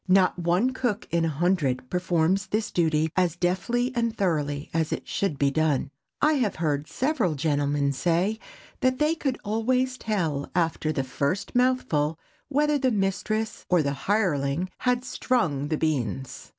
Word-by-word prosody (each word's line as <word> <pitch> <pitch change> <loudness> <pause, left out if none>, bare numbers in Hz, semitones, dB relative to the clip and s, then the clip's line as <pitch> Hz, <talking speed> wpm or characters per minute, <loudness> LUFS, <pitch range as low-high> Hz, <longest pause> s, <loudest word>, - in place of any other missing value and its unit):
Not 185 -1 +4
one 175 +9 +2
cook 245 -5 -2
in 170 -1 +2
a - - +1
hundred 145 -6 0
performs 180 +1 +1
this 215 0 -1
duty 160 -2 +1
as 180 -3 +2
deftly 185 +8 0
and 230 -1 0
thoroughly 150 -6 -1
as 160 -1 0
it - - -4
should 195 -8 -1
be 140 0 +2
done. 150 -3 +1 0.3
I 305 +1 +5
have 215 -5 0
heard 150 -2 -1
several 255 - 0
gentlemen 145 -1 +1
say 175 +8 +1 0.4
that 255 -2 +2
they 300 +3 +2
could 275 -6 -2
always 255 +4 0
tell, 165 -10 -1
after 165 -2 +1
the 135 -3 -1
first 140 +8 -2
mouthful, 245 -12 +1 0.3
whether 295 +1 +2
the 260 -1 +2
mistress 215 +1 -1
or 180 -3 +4
the 140 -1 0 0.2
hireling 175 -5 +1
had 250 0 +1
"strung" 160 - 0
the 155 0 -1
beans. 135 -5 -2
180 Hz, 155 wpm, -26 LUFS, 150-225 Hz, 0.4 s, I